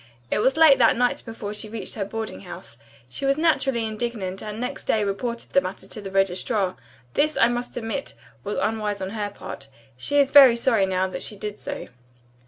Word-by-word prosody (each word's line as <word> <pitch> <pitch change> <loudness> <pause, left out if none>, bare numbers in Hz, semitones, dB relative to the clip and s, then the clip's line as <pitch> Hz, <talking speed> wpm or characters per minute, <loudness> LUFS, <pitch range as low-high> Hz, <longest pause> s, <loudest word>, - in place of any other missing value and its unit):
It - - +2
was 265 +7 +2
late 315 -4 +7
that 230 - +5
night 245 0 +1
before 220 -2 -5
she 215 +1 -5
reached 220 -3 -6
her 205 - -2
boarding 220 +2 -5
house. 175 -10 -10 0.3
She 125 - -7
was 275 +1 +2
naturally 275 -7 +2
indignant 215 -4 -3
and 215 0 -6
next 250 +3 -4
day 215 - +2
reported 235 +4 -3
the 275 - +4
matter 190 -2 -6
to 210 - -7
the 195 - -6
registrar. 195 +1 0 0.4
This, 305 +1 +2
I - - +5
must 240 0 -3
admit, 240 +4 -4 0.3
was 205 +1 -3
unwise 215 -2 -1
on 190 +1 -4
her 210 -2 -3
part. 140 -8 -9 0.3
She 285 - -1
is 280 -1 +4
very 270 -4 +9
sorry, 230 -5 +2
now, 190 0 +1
that - - -6
she 210 - -4
did 210 0 -6
so." - - -6
220 Hz, 200 wpm, -24 LUFS, 195-245 Hz, 0.4 s, very